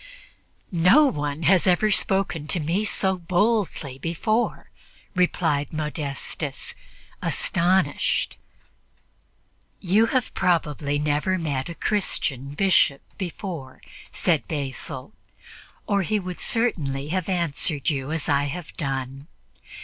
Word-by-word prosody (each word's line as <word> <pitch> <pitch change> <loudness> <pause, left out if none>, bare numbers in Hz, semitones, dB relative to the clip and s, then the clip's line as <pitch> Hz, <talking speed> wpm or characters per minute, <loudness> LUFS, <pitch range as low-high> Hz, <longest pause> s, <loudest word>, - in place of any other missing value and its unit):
"No 185 - +6
one 150 - -1
has 185 +3 +4
ever 200 +4 +4
spoken 175 -7 +1 0.4
so 190 -2 0
boldly 200 +4 +2
to - - -7
me 130 0 -9
before," 215 - -1 0.4
replied 165 -5 +1
Modestus, 150 -3 -4 0.5
astonished. 175 -3 +1 1.4
"You 205 +5 +3
have 255 0 0
probably 150 -5 +1
never 150 +5 +1
met 145 -4 -2
a 170 - -6
Christian 145 - -1
Bishop 180 -6 +3 0.2
before," 175 -7 -5 0.3
said 165 -5 +1
Basil, 140 -5 -5 0.7
"or 200 -1 +2
he 210 +3 0
would 180 -2 -6
certainly 150 - 0
have 185 +1 -1
answered 165 -4 0
you 135 0 -3
as 160 -2 -2
I 145 0 +2
have 155 +3 -6
done. 135 -2 -3
165 Hz, 105 wpm, -24 LUFS, 145-190 Hz, 1.4 s, No